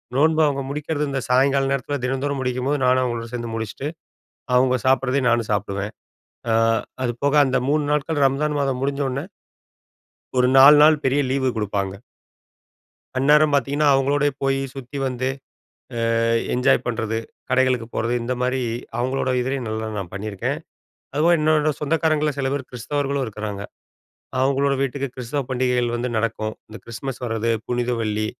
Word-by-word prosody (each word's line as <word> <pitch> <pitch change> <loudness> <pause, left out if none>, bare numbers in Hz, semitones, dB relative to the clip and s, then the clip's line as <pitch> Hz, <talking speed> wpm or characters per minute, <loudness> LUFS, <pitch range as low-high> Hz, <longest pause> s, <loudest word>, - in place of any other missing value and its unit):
நோன்பு 155 +3 +3
அவுங்க 140 -1 -1
முடிக்கிறது 150 +1 -2
இந்த 135 - -1
சாயங்கால 135 +2 +3
நேரத்தில 140 +1 -1
தினந்தோறும் 135 +2 -1
முடிக்கும்போது, 130 +3 -1
நானும் 130 0 +4
அவுங்களோடு 120 -1 -3
சேர்ந்து 120 -1 -4
முடிச்சுட்டு, 110 +5 -4 0.7
அவுங்க 130 0 +4
சாப்பிட்றதையும் 130 0 +2
நானும் 115 -2 +1
சாப்பிடுவேன். 100 0 -2 0.6
அ - - +3 0.5
அதுபோக 130 +4 0
அந்த 130 - +1
3 150 +1 +2
நாட்கள் 150 0 +1
ரம்ஜான் 150 +2 0
மாதம் 135 -2 0
முடிஞ்ச 140 +1 -1
உடனே. 135 +4 -3 1.1
ஒரு 125 - +4
4 140 +3 +9
நாள் 155 -1 +5
பெரிய 135 +2 +2
லீவு 130 -1 +1
குடுப்பாங்க. 100 -2 -2 1.2
அந்நேரம் 150 +2 +4
பாத்தீங்கன்னா, 145 +1 +2
அவங்களோடயே 145 +2 +2
போயி 135 0 +1
சுத்தி 135 +1 -7
வந்து, 130 0 -2 0.9
அ - - +2 0.3
என்ஜாய் 125 +1 +3
பண்றது, 115 -2 -1 0.3
கடைகளுக்கு 130 -2 +2
போறது 115 +2 0
இந்த 120 +2 -2
மாரி 130 +1 0 0.4
அவங்களோட 130 +1 0
இதுலையும் 130 0 -2
நல்லா 110 0 -3
நான் 90 -3 -5
பண்ணீருக்கேன். 100 0 -3 0.6
அதுபோக 160 +4 +4
என்னோட 155 0 +3
சொந்தக்காரங்கள்ல 155 0 +1
சில 135 - 0
பேரு 140 -1 -2
கிறிஸ்தவர்களும் 140 +3 -2
இருக்குறாங்க. 105 -2 -5 0.8
அவங்களோட 140 +1 +2
வீட்டுக்கு 140 +1 -1
கிறிஸ்தவ 130 +3 -3
பண்டிகைகள் 125 -2 +1
வந்து 120 +1 -2
நடக்கும். 110 -1 -1 0.2
இந்த 110 - -9
கிறிஸ்மஸ் 125 +3 -6
வர்ரது, 115 0 -1 0.2
புனித 120 0 -1
வெள்ளி, 110 -1 -1
130 Hz, 140 wpm, -22 LUFS, 120-140 Hz, 1.2 s, 4